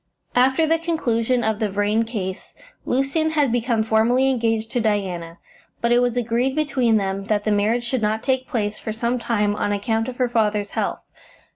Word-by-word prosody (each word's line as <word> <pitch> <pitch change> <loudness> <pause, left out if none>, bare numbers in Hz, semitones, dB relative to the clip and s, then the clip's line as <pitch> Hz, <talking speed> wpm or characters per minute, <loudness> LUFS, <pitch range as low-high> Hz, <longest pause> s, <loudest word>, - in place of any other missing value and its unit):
After 265 +5 +3
the 325 +1 +2
conclusion 250 -8 0
of 220 -1 0
the 215 - 0
Vrain 205 +3 +1
case 190 -5 -5 0.3
Lucian 275 +5 +1
had 295 -5 +1
become 230 -2 +1
formally 235 +5 +3
engaged 225 -3 -1
to 245 - 0
Diana, 185 -6 -2 0.4
but 235 - 0
it 240 - +5
was 245 -1 0
agreed 245 +3 0
between 260 -7 +2
them 195 -1 -2
that 205 0 0
the 215 - 0
marriage 215 +4 +1
should 240 0 -2
not 215 +1 0
take 260 -1 0
place 210 -3 -2
for 220 - -4
some 235 +3 -1
time 210 -3 0
on 205 - -1
account 225 +2 -1
of 250 -1 -6
her 250 - +2
father's 210 -3 0
health. - - -2
230 Hz, 185 wpm, -22 LUFS, 210-250 Hz, 0.4 s, it